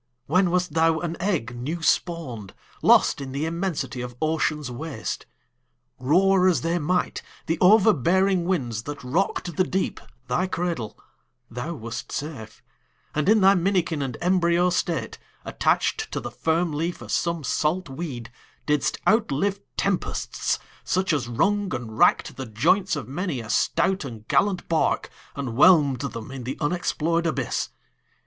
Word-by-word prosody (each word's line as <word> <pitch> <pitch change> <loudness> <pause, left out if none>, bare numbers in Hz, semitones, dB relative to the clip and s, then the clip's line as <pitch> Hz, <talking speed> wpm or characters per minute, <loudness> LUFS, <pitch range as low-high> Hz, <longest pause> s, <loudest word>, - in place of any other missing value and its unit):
When 185 +4 +3
wast 180 -2 0
thou 165 0 +3
an 170 -1 -3
egg 165 - -1
new 155 +8 -4
spawn'd, 135 - -1 0.3
Lost - - +5
in 135 -1 -6
the 140 +3 -1
immensity 165 -6 -3
of 125 -1 -6
ocean's 155 -3 0
waste? 135 -2 -5 0.7
Roar 185 +7 +4
as 180 - +3
they 170 +2 0
might, 180 +4 0 0.2
the 165 0 -1
overbearing 190 - +4
winds 125 -12 -1
That 145 -2 -6
rock'd 170 +4 -1
the 185 - +4
deep, 190 +1 -2 0.3
thy 175 +10 0
cradle, 170 - -3 0.5
thou 125 +8 -4
wast 115 -1 -6
safe 135 -8 -6 0.5
And 150 +4 +1
in 215 -1 +5
thy 195 +1 +7
minikin 180 -4 +1
and 130 -4 -3
embryo 180 0 +3
state, 170 -3 -2 0.3
Attach'd - - 0
to - - -2
the - - -6
firm 165 +1 0
leaf 165 +4 -3
of - - -8
some 170 -2 0
salt 160 +7 0
weed, 135 -5 -6 0.3
Didst 150 0 +1
outlive 200 -2 +2 0.2
tempests, 195 -2 -1 0.3
such 185 -2 0
as 135 -6 -1
wrung 200 - +1
and 110 -2 -6
rack'd - - +3
The 130 -2 -5
joints 170 - +2
of 145 - -5
many 150 0 -3
a 115 -2 -5
stout 180 +2 +1
and 115 -5 -9
gallant 195 -3 +1
bark, 165 -1 0 0.2
And 140 -3 -3
whelm'd 140 0 +5
them 115 -5 -6
in 135 -2 -6
the 130 +3 -4
unexplor'd 170 +1 0
abyss. 135 -6 -1
165 Hz, 150 wpm, -24 LUFS, 135-180 Hz, 0.7 s, thy